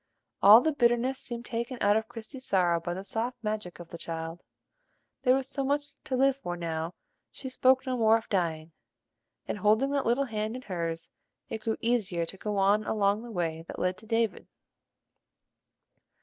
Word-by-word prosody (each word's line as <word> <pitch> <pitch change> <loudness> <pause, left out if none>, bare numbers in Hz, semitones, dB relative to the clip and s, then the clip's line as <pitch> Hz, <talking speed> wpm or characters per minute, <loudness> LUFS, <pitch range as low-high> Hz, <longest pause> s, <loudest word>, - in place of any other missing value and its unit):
All 210 +4 +10
the 315 - +2
bitterness 245 -1 +2
seemed 240 -1 -6
taken 235 +2 -3
out 205 +1 +4
of 220 0 0
Christie's 240 +3 -9
sorrow 175 -3 +3
by 175 +1 -4
the 190 - -5
soft 230 +5 -2
magic 210 -5 -3
of 170 -1 -10
the 170 - -8
child: 165 +1 -5 0.8
there 255 -1 +5
was 265 -1 -1
so 275 0 -3
much 285 +1 0
to 260 - -1
live 270 +1 +4
for 175 -11 -5
now 165 0 -3 0.3
she 265 - -7
spoke 260 +1 +3
no 255 -1 -1
more 225 -2 +5
of 225 - -9
dying; 165 -4 -1 0.8
and, - - -3
holding 220 +7 +3
that 280 -3 0
little 250 +4 +2
hand 215 -1 -3
in 255 - -7
hers, 165 -4 -4 0.4
it 220 - -4
grew 220 0 -1
easier 205 -8 +1
to 165 - -8
go 210 +1 -3
on 200 +2 +4
along 205 0 +1
the 240 - -9
way 165 -5 -2
that - - -7
led 180 0 0
to 220 - -15
David. 225 -1 0
220 Hz, 185 wpm, -29 LUFS, 180-250 Hz, 0.8 s, All